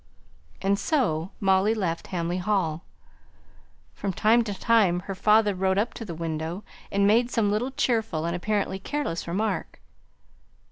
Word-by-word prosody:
And 200 Hz, +1 st, +2 dB
so 190 Hz, -, 0 dB
Molly 195 Hz, +2 st, +3 dB
left 175 Hz, -6 st, -2 dB
Hamley 175 Hz, 0 st, -2 dB
Hall. 180 Hz, -5 st, 0 dB, 1.1 s
From 200 Hz, -, -3 dB
time 225 Hz, +5 st, +3 dB
to 205 Hz, -, -3 dB
time 205 Hz, -7 st, +3 dB
her 195 Hz, -, -5 dB
father 210 Hz, +2 st, +3 dB
rode 190 Hz, 0 st, 0 dB
up 215 Hz, +4 st, 0 dB
to -, -, -7 dB
the 170 Hz, -5 st, -6 dB
window, 165 Hz, +3 st, -4 dB, 0.3 s
and 200 Hz, 0 st, +2 dB
made 230 Hz, +4 st, +4 dB
some 220 Hz, -5 st, +1 dB
little 220 Hz, +5 st, 0 dB
cheerful 225 Hz, -, 0 dB
and 170 Hz, +1 st, -1 dB
apparently 200 Hz, +1 st, -1 dB
careless 240 Hz, -, -3 dB
remark. 205 Hz, +6 st, -2 dB
200 Hz, 145 wpm, -26 LUFS, 175-220 Hz, 1.1 s, made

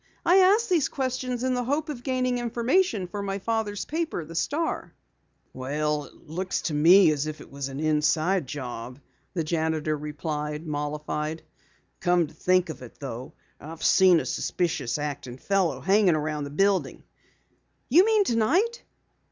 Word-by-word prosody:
"I 360 Hz, +2 st, +6 dB
ask 400 Hz, +5 st, +5 dB
these 340 Hz, -7 st, +2 dB
questions 255 Hz, -2 st, -2 dB
in 260 Hz, 0 st, +1 dB
the 250 Hz, 0 st, 0 dB
hope 290 Hz, +6 st, -1 dB
of 285 Hz, -6 st, -6 dB
gaining 255 Hz, -1 st, 0 dB
information 240 Hz, -, +1 dB
for 200 Hz, +3 st, -5 dB
my 195 Hz, -1 st, -2 dB
father's 210 Hz, -1 st, -2 dB
paper, 320 Hz, -, -3 dB
the 165 Hz, -, -10 dB
Star." 300 Hz, -, -2 dB, 0.6 s
"Well, 150 Hz, +3 st, -2 dB
it -, -, -19 dB
looks 180 Hz, +4 st, -3 dB
to 160 Hz, -, -2 dB
me 165 Hz, +4 st, +6 dB
as 150 Hz, 0 st, -1 dB
if 155 Hz, 0 st, -5 dB
it -, -, -13 dB
was 140 Hz, 0 st, -4 dB
an 135 Hz, +1 st, -6 dB
inside 155 Hz, +2 st, +1 dB
job," 125 Hz, -2 st, -6 dB, 0.4 s
the 165 Hz, -, 0 dB
janitor 160 Hz, -1 st, -1 dB
replied, 150 Hz, +1 st, -4 dB
mollified. 150 Hz, +1 st, -3 dB, 0.6 s
"Come 175 Hz, -1 st, +3 dB
to 155 Hz, -, -13 dB
think 185 Hz, +2 st, +2 dB
of 160 Hz, -, -7 dB
it 125 Hz, -, -11 dB
though, 130 Hz, +2 st, -7 dB, 0.3 s
I've 160 Hz, +2 st, -9 dB
seen 185 Hz, -3 st, +6 dB
a -, -, -4 dB
suspicious 165 Hz, -9 st, -1 dB
acting 145 Hz, -4 st, -5 dB
fellow 195 Hz, +3 st, 0 dB
hanging 195 Hz, -2 st, +4 dB
around 150 Hz, -1 st, -2 dB
the -, -, -6 dB
building." 195 Hz, +6 st, 0 dB, 0.8 s
"You 330 Hz, +9 st, +6 dB
mean 435 Hz, -1 st, +4 dB
tonight?" 355 Hz, -, +1 dB
170 Hz, 160 wpm, -26 LUFS, 150-240 Hz, 0.8 s, I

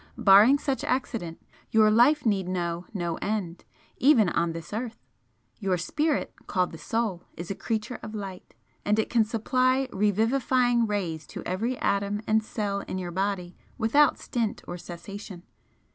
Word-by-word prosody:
Barring 220 Hz, +4 st, +7 dB
such 275 Hz, -2 st, -2 dB
accident, 230 Hz, -10 st, -2 dB, 0.3 s
your 215 Hz, -1 st, +5 dB
life 250 Hz, +7 st, +4 dB
need 195 Hz, -4 st, +1 dB
know 175 Hz, -1 st, -2 dB
no 175 Hz, -5 st, -2 dB
end, 195 Hz, -5 st, -3 dB, 0.3 s
even 245 Hz, -8 st, +5 dB
on 170 Hz, -1 st, 0 dB
this 165 Hz, +3 st, -8 dB
earth. 225 Hz, +1 st, -4 dB, 0.6 s
Your 190 Hz, -4 st, 0 dB
Spirit, 300 Hz, -, -1 dB
called 185 Hz, -2 st, 0 dB
the 160 Hz, -, -10 dB
Soul, 215 Hz, -4 st, -2 dB
is 170 Hz, +3 st, -5 dB
a -, -, 0 dB
Creature 225 Hz, +3 st, -3 dB
of 215 Hz, 0 st, -7 dB
Light 195 Hz, -3 st, -8 dB, 0.3 s
and 210 Hz, +1 st, +2 dB
it 220 Hz, -, 0 dB
can 235 Hz, -2 st, +4 dB
supply 255 Hz, +4 st, +1 dB
revivifying 235 Hz, +4 st, +2 dB
rays 175 Hz, -7 st, -3 dB
to -, -, -8 dB
every 230 Hz, +8 st, -1 dB
atom 200 Hz, +1 st, 0 dB
and 220 Hz, 0 st, +3 dB
cell 205 Hz, -2 st, -2 dB
in -, -, -3 dB
your 180 Hz, -2 st, -4 dB
body 185 Hz, -1 st, -2 dB, 0.2 s
without 260 Hz, +6 st, +4 dB
stint 230 Hz, -4 st, -3 dB
or 175 Hz, -, -5 dB
cessation. 175 Hz, +2 st, -9 dB
210 Hz, 155 wpm, -27 LUFS, 185-235 Hz, 0.6 s, Barring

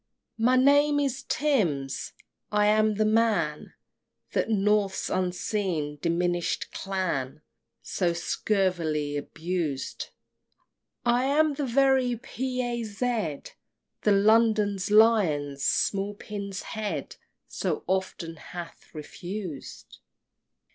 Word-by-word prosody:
XXV. -, -, -2 dB
My 255 Hz, +1 st, +5 dB
name 285 Hz, +3 st, +5 dB
is 275 Hz, -1 st, -1 dB
Tims. 170 Hz, -, 0 dB, 0.4 s
I 210 Hz, 0 st, +3 dB
am 215 Hz, 0 st, +3 dB
the 215 Hz, +1 st, +2 dB
man 225 Hz, +1 st, +1 dB, 0.6 s
That -, -, 0 dB
North's 205 Hz, -2 st, +1 dB
unseen 180 Hz, -5 st, -1 dB
diminish'd 175 Hz, 0 st, 0 dB
clan 155 Hz, -7 st, -3 dB, 0.4 s
So 175 Hz, -3 st, 0 dB
scurvily 170 Hz, -4 st, 0 dB
abused! 160 Hz, -1 st, -3 dB, 1.0 s
I 240 Hz, +2 st, +3 dB
am 300 Hz, +2 st, +3 dB
the 280 Hz, -1 st, -2 dB
very 260 Hz, -1 st, +3 dB
P. 255 Hz, +1 st, -3 dB
A. 240 Hz, -1 st, -2 dB
Z. 215 Hz, -, -2 dB, 0.6 s
The 210 Hz, -, +3 dB
London's 210 Hz, -1 st, +3 dB
Lion's 175 Hz, -11 st, +3 dB
small 200 Hz, +1 st, +1 dB
pin's 200 Hz, -2 st, -6 dB
head 215 Hz, -1 st, -4 dB, 0.3 s
So -, -, -2 dB
often 185 Hz, -3 st, -2 dB
hath 170 Hz, +1 st, -9 dB
refused! 175 Hz, 0 st, -7 dB
205 Hz, 100 wpm, -27 LUFS, 170-230 Hz, 1.0 s, My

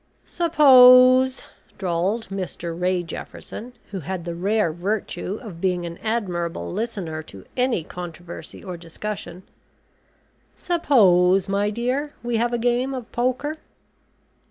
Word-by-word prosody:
"Suppose," 260 Hz, -5 st, +6 dB, 0.3 s
drawled 190 Hz, +5 st, -1 dB
Mr 180 Hz, -3 st, -5 dB
Ray 180 Hz, +1 st, 0 dB
Jefferson, 220 Hz, +7 st, -8 dB, 0.2 s
who 195 Hz, -, -4 dB
had 175 Hz, +2 st, -5 dB
the 170 Hz, -, -3 dB
rare 190 Hz, 0 st, 0 dB
virtue 190 Hz, +1 st, -3 dB
of 180 Hz, -7 st, -9 dB
being 180 Hz, -2 st, 0 dB
an 170 Hz, 0 st, -7 dB
admirable 175 Hz, -, -2 dB
listener 185 Hz, -9 st, -4 dB
to 100 Hz, -11 st, -13 dB
any 250 Hz, -8 st, +1 dB
controversy 175 Hz, 0 st, -9 dB
or 180 Hz, -3 st, -6 dB
discussion. 180 Hz, +2 st, -7 dB, 1.1 s
"Suppose, 195 Hz, -, +3 dB
my 200 Hz, +1 st, +1 dB
dear, 255 Hz, +7 st, -2 dB
we 240 Hz, -1 st, -1 dB
have 235 Hz, +1 st, +1 dB
a 240 Hz, -, 0 dB
game 245 Hz, +3 st, 0 dB
of 245 Hz, -3 st, -8 dB
poker." 255 Hz, +6 st, -1 dB
200 Hz, 120 wpm, -23 LUFS, 175-245 Hz, 1.1 s, Suppose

